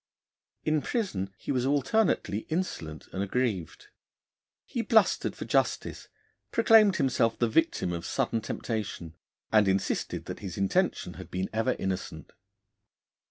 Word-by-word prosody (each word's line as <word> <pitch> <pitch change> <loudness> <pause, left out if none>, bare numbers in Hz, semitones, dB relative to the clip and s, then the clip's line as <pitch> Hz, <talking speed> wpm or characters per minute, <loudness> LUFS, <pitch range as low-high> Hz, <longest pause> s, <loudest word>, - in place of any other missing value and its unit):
In 155 -1 +1
prison 140 - -2
he - - -4
was 125 -3 +1
alternately 140 - +1
insolent 85 - -3
and 95 - -2
aggrieved. 100 -4 -2 0.8
He 235 - -2
blustered 220 -3 +3
for - - -6
justice, - - 0 0.4
proclaimed 215 -5 +6
himself 125 -5 +2
the 120 - +2
victim 115 - +1
of 85 -1 -4
sudden 115 - 0
temptation, 105 -8 -4 0.4
and 105 -2 +5
insisted 95 0 -1
that - - -6
his 95 -4 -6
intention 100 -1 +1
had - - -11
been 95 +1 -3
ever 115 +3 +1
innocent. 90 -5 -4
115 Hz, 125 wpm, -28 LUFS, 95-155 Hz, 0.8 s, proclaimed